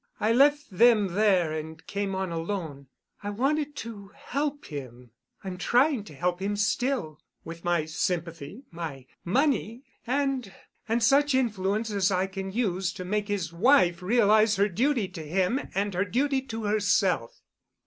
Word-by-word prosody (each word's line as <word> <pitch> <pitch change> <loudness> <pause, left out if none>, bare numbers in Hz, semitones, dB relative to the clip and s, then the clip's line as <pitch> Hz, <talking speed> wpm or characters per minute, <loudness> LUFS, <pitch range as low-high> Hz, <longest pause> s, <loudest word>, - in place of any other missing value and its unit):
I 215 - +2
left 290 +3 +4
them 215 0 +4
there 190 -5 +3
and 160 +1 -7
came 200 -1 -3
on 190 -2 -2
alone. 165 -5 -4 0.3
I 205 - -4
wanted 285 +7 -1
to 205 -4 -9
help 285 +1 -3
him—I'm 125 - -10
trying 250 - +2
to 155 - -12
help 175 +4 -1
him 205 +1 -1
still—with 205 - -3
my 175 -3 +1
sympathy, 165 - -3
my 160 -6 -6 0.2
money—and—and 250 - -2
such 280 +3 +4
influence 215 -3 0
as 200 -2 +2
I 185 -1 +1
can 195 0 -6
use 190 -5 -1
to 185 - -7
make 205 +2 -1
his 190 -6 -2
wife 185 -3 +4
realize 215 +1 +4
her 200 +1 +3
duty 235 +2 +1
to 165 - -8
him 180 - 0 0.2
and 200 +1 0
her 185 +3 0
duty 265 +6 0
to 225 -2 -5
herself." 200 - +1
200 Hz, 140 wpm, -27 LUFS, 175-240 Hz, 0.3 s, left